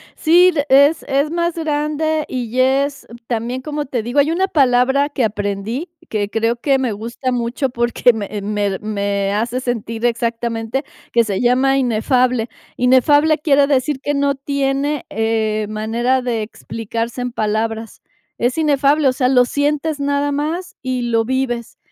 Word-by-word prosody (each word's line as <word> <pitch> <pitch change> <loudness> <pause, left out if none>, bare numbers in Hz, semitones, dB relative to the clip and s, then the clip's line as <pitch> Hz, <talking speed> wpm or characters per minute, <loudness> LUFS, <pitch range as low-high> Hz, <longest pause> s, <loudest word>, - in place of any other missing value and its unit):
Sí, 350 +3 +5
le 290 -2 0
es 285 +4 +5
es 280 +2 +1
más 340 0 -1
grande 305 0 -1
y 250 -1 -4
es 275 +1 +1 0.2
también, 240 +2 -2
¿cómo 295 +1 -4
te 250 -3 -2
digo?, 245 +6 -1
hay 295 +3 +3
una 380 +3 +1
palabra 270 -1 +3
que 265 -4 0
aprendí, 210 - -3 0.2
que 205 -2 -2
creo 225 +2 0
que 270 +2 +1
me 245 -5 -1
gusta 235 +4 -4
mucho, 245 +3 -1
porque 240 0 +2
me 210 -3 -5
me 205 0 -1
re 190 - -4
me 200 -1 -1
hace 235 +4 -1
sentir 230 -2 -3
exactamente, 235 +2 -1 0.3
que 235 -1 +3
se 200 0 -2
llama 260 +2 +3
inefable. 250 -1 +1 0.3
Inefable 290 +5 +4
quiere 285 -2 +3
decir 275 0 0
que 290 - -2
no 280 0 +1
tiene, 280 +1 -1
eh, 220 -1 0
manera 235 +4 0
de 235 -3 -2
explicarse 230 +2 -5
en 245 -1 -4
palabras. 220 +1 -2 0.4
Es 245 +5 0
inefable, 290 -1 +3
o - - 0
sea, 255 -1 +1
lo 250 -1 +5
sientes 295 +2 -1
nada 285 0 0
más 320 +5 -3
y 255 -1 -2
lo 230 -1 +1
vives. 245 -2 -2
255 Hz, 160 wpm, -18 LUFS, 230-285 Hz, 0.4 s, Sí